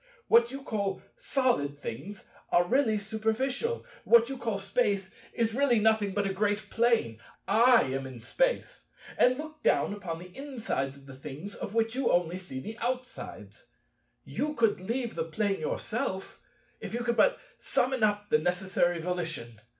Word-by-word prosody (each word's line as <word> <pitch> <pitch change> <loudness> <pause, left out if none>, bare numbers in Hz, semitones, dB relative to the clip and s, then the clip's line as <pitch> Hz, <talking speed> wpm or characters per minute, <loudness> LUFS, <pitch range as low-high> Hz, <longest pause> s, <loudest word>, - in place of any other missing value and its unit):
What 235 0 +6
you 270 0 -7
call 200 -6 -2
Solid 190 - 0
things 190 - -7 0.3
are 175 0 +5
really 240 -2 +3
superficial; 225 - -1 0.2
what 235 +1 +6
you 270 - -4
call 225 -4 -1
Space 200 -1 0 0.2
is 225 -1 0
really 265 -1 +3
nothing 215 -2 +2
but 205 -1 +1
a 195 - -1
great 205 +1 -1
Plane. 230 - +2 0.3
I 230 +3 +6
am 135 0 -3
in 125 -4 -10
Space, - - -1 0.3
and 250 +1 +4
look 310 +1 -8
down - - +2
upon 180 -5 -5
the 180 +1 -12
insides 230 - -3
of 140 - -17
the 135 - -10
things 150 +8 -7
of 205 - -6
which 225 0 +2
you 260 -1 +1
only 175 +1 +1
see 180 -8 -7
the 220 - -7
outsides. 250 +1 -5 0.6
You 300 +1 -2
could 225 -7 +2
leave 235 +4 -2
the 165 - -1
Plane 200 +4 -1
yourself, 190 +4 -3 0.4
if - - -5
you 240 - -1
could 235 0 +1
but - - +5 0.2
summon 255 0 0
up 210 -1 +1
the 150 - +5
necessary 180 0 +1
volition. 165 -10 -4
210 Hz, 165 wpm, -29 LUFS, 180-240 Hz, 0.6 s, What